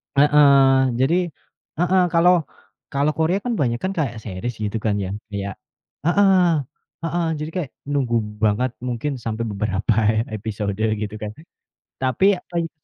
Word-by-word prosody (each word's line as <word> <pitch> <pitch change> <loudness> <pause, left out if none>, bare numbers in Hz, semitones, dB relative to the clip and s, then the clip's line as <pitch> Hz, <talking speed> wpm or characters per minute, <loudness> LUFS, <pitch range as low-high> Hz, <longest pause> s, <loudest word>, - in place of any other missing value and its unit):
Heeh. 140 -3 +5
Jadi 135 +6 +3 0.6
heeh, 180 +1 +3
kalau 175 +2 +6 0.6
kalau 140 +2 +1
Korea 165 +5 +2
kan 245 - -1
banyak 120 -4 0
kan 185 - 0
kayak 130 -8 -1
series, 110 +4 -5
gitu 105 +1 -2
kan, 105 -1 0
ya, 95 - -4 0.2
kayak 100 -2 -4 0.5
heeh 195 +2 +4 0.7
heeh, 170 +1 -1
jadi 150 +1 -4
kayak 170 -7 -2 0.2
nunggu 130 -5 0 0.2
banget 110 +4 +1
mungkin 125 +3 -3
sampai 115 0 -3
beberapa 105 0 -1 0.4
episode, 105 -1 -3 0.3
gitu 105 0 -4
kan. 105 -1 -5 0.7
Tapi, 130 +7 +2
apa 180 - -20
ya, 165 -1 -1
130 Hz, 140 wpm, -22 LUFS, 110-160 Hz, 0.7 s, kalau